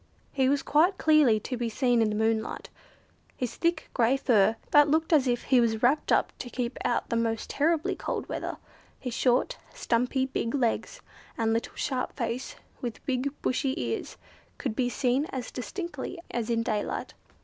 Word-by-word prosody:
He 265 -2 +2
was 280 0 +1
quite 345 +6 +3
clearly 300 -8 +5
to 255 - -4
be 235 -1 -2
seen 245 0 +2
in 220 - +3
the 210 - -2
moonlight. 220 0 -1 0.7
His 250 -3 -3
thick, 335 -2 0
grey 245 +2 +3
fur, 225 -5 +3 0.2
that 295 0 +7
looked 320 +2 +2
as 280 -4 +4
if 240 -1 0
he 255 -3 +4
was 225 -1 0
wrapped 275 +5 +3
up - - +3
to 245 - -6
keep 240 -1 -3
out 240 - 0
the - - +1
most 225 -1 -1
terribly 315 +2 +1
cold - - -4
weather; - - -4 0.4
his 250 -3 -5
short, 255 - +1 0.2
stumpy, 250 +3 +1
big 265 -2 -2
legs, 240 -5 -1 0.4
and 225 -2 +1
little 230 - -2
sharp 255 -3 -2
face 235 0 -3 0.3
with 240 -3 -5
big 260 +1 0
bushy 265 +1 0
ears, 115 -2 -3 0.4
could 220 - -3
be 245 0 +1
seen 255 +3 +1
as 260 -5 -5
distinctly 345 - -5
as 235 -2 -2
in 230 -1 +1
daylight. 210 -2 -2
250 Hz, 175 wpm, -28 LUFS, 230-280 Hz, 0.7 s, that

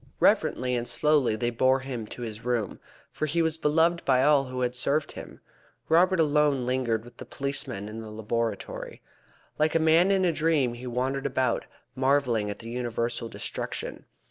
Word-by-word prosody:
Reverently 125 0 +2
and 120 0 -2
slowly 145 -2 +2
they 120 +2 -1
bore 130 +3 +2
him 125 -5 -5
to 120 - -7
his 110 -1 -7
room, 120 -4 -1 0.3
for 155 - -2
he 165 +3 +1
was 160 -1 0
beloved 165 +3 +2
by 130 -1 +3
all 145 -1 +4
who 125 0 -5
had 125 0 0
served 145 +4 0
him. - - -10 0.5
Robert 180 +3 +4
alone 150 -4 +3
lingered 125 -3 0
with 120 0 -15
the - - -7
policeman 135 -7 -4
in 110 +1 -7
the 110 - -8
laboratory. 110 +2 -4 0.6
Like 155 +1 +2
a - - +5
man 160 +4 +4
in 190 -1 +3
a 175 - +3
dream 155 -6 +1
he 120 +1 -8
wandered 130 +3 -1
about, 130 -3 0 0.3
marvelling 130 -5 +1
at 100 - -4
the 115 +1 -9
universal 120 -1 -3
destruction. - - -5
130 Hz, 175 wpm, -27 LUFS, 120-150 Hz, 0.6 s, a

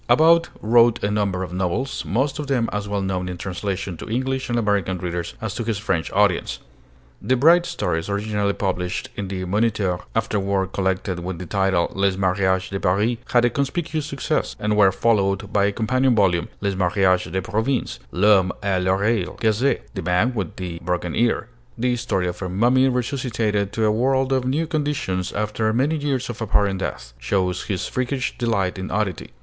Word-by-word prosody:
About 165 +2 +5
wrote 115 +1 +4
a 100 - +1
number 100 -3 0
of 90 -1 -7
novels, 95 +9 -2
most 135 +7 0
of 150 - -4
them 125 -4 +1
as 105 0 -2
well 100 -1 -1
known 90 -1 -2
in 90 - -5
translation 95 0 -4
to - - -8
English 130 +3 -1
and 120 - 0
American 100 -4 +1
readers 85 -1 -4
as 110 -2 -4
to 115 - -3
his 110 -2 -1
French 95 -6 -1
audience. 100 -3 +2 0.6
The 130 - +2
bright 170 +7 +5
stories 80 +3 -2
originally 100 0 0
published 90 -3 -2
in 100 - -4
the 95 -1 -4
Moniteur, 100 -2 0 0.2
afterward 100 -3 0
collected 95 -1 -1
with 90 0 -5
the 90 - -6
title 95 -2 +1
'Les 95 -1 +1
Mariages 95 0 +1
de 95 - -2
Paris' 105 +6 +1
had 120 -1 +4
a 120 - +2
conspicuous 155 +2 -2
success, 140 -3 -2
and 105 0 0
were 100 -2 +5
followed 100 -1 +1
by 100 -1 +3
a 100 - +2
companion 125 +4 +2
volume, 90 -5 +2
'Les 100 -1 0
Mariages 95 0 +2
de 95 - 0
Province.' 110 +7 -1
'L'Homme 95 -1 +4
à 95 -2 +1
l'Oreille 95 +1 +1
Cassée' 115 +5 +2
(The - - -4
Man 90 +8 +1
with 100 -8 -3
the 90 -2 -5
Broken 90 -1 -2
Ear) 120 -1 +1 0.3
the 125 +1 +1
story 110 -7 -1
of 90 - -5
a 95 - -3
mummy 125 +8 +3
resuscitated 115 -5 -1
to 110 - +1
a 105 - +4
world 130 +4 +1
of 130 -1 +1
new 145 +6 0
conditions 145 - -2
after 105 +1 -1
many 135 +8 +1
years 140 -4 -1
of 120 -1 -6
apparent 100 -3 +1
death - - -5
shows 90 +7 -1
his 95 -4 -2
freakish 130 +1 -2
delight 100 -6 0
in 95 - -5
oddity. 100 -2 -2
105 Hz, 185 wpm, -22 LUFS, 95-120 Hz, 0.6 s, About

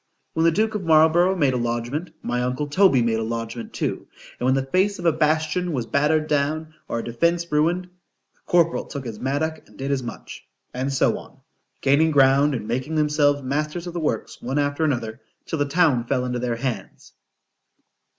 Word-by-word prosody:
When 160 - +1
the 165 - +5
duke 215 +5 +1
of 210 -3 -3
Marlborough 165 +3 +4
made 145 -7 +2
a - - 0
lodgment,——my 120 +2 -3
uncle 125 +4 -1
Toby 145 -4 +4
made 115 -1 +1
a - - -1
lodgment 115 +1 -5
too.——And - - -6
when 130 +1 +3
the 135 -1 0
face 190 +8 +1
of 175 - -7
a 165 - +5
bastion 155 +3 0
was 125 -5 -2
battered 150 +4 +2
down, 155 +2 -1
or - - -2
a 115 - -3
defence 170 +8 0
ruined,—the 170 +4 +1 0.6
corporal 170 -1 +3
took 140 -3 -7
his 110 -3 -6
mattock 150 +4 -2
and - - -19
did 135 +1 -3
as 135 -2 0
much,—and 125 +2 -7
so 135 - +2
on;——gaining 145 +4 -1
ground, 140 0 +4
and 105 -3 -5
making 130 +6 -2
themselves 150 -2 +2
masters 150 +6 -2
of 175 - -6
the 175 - -3
works 150 -8 -3
one 130 +4 -3
after 145 +2 0
another, 120 -5 -2 0.2
till 160 - -3
the 145 - +2
town 145 -5 +2
fell 125 +1 0
into 125 -1 -2
their 120 -1 -1
hands. 125 0 -5
145 Hz, 180 wpm, -23 LUFS, 125-160 Hz, 0.6 s, the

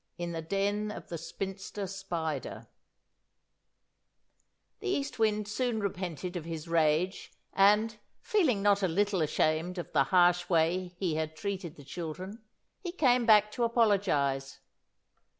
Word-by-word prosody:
IN 175 0 -4
THE 165 -1 -4
DEN 200 +5 -1
OF - - -8
THE 170 - -4
SPINSTER 195 +4 -5
SPIDER 170 -7 -4 2.1
The 415 - -6
East 285 -9 -2
Wind 215 -1 +1
soon 235 +1 -1
repented 180 -3 -4
of 175 - -3
his 165 0 -6
rage, 165 +3 +1 0.2
and, 210 +3 +4 0.2
feeling 320 - +1
not 205 0 +4
a 190 - +2
little 195 +2 +1
ashamed 155 +3 0
of 175 - -5
the 140 -3 +3
harsh 175 +3 +3
way 175 +2 +1
he 175 -5 -1
had 160 0 -3
treated 190 -3 -4
the 145 - -14
children, 180 - -6 0.4
he 350 - -3
came 250 -8 +2
back 210 -1 +6
to 240 - -2
apologise. 190 - +1
190 Hz, 135 wpm, -30 LUFS, 165-210 Hz, 2.1 s, back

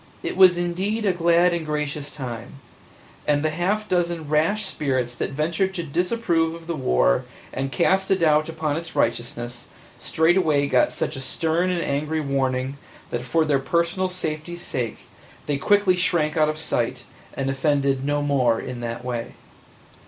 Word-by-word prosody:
It - - -3
was 185 -2 +7
indeed 190 +6 -1
a 190 - +3
glad 170 +1 +3
and 170 -1 -1
gracious 150 -1 -3
time, 125 -4 -7 0.7
and 145 0 +2
the 155 - +1
half 195 +6 -1
dozen 170 -4 0
rash 165 +8 +1
spirits 130 -9 -1
that - - -2
ventured 170 +7 -1
to 170 - -2
disapprove 170 0 0
of 165 0 -11
the 170 0 -3
war 60 - +2 0.3
and 135 +1 -2
cast 190 +9 +2
a 195 - +5
doubt 155 -2 +3
upon 155 -2 -2
its 170 0 -6
righteousness 120 0 -2 0.3
straightway 160 -3 +2
got 125 -2 +3
such 150 - -2
a 135 - -5
stern 165 +6 0
and 180 -2 0
angry 150 +3 -1
warning 135 -1 -1 0.3
that 120 - -2
for 155 +6 +1
their 145 -3 +2
personal 170 +6 0
safety's 175 -1 -4
sake 120 -4 -4 0.4
they 145 -2 0
quickly 200 +3 +4
shrank 170 -4 +1
out 155 -1 +3
of 155 - -3
sight 125 -5 -2 0.3
and 135 0 -1
offended 140 -1 +1
no 145 +1 0
more 130 -5 +2
in 125 -1 -6
that 120 +1 -5
way. 120 -2 -4
155 Hz, 165 wpm, -23 LUFS, 135-175 Hz, 0.7 s, was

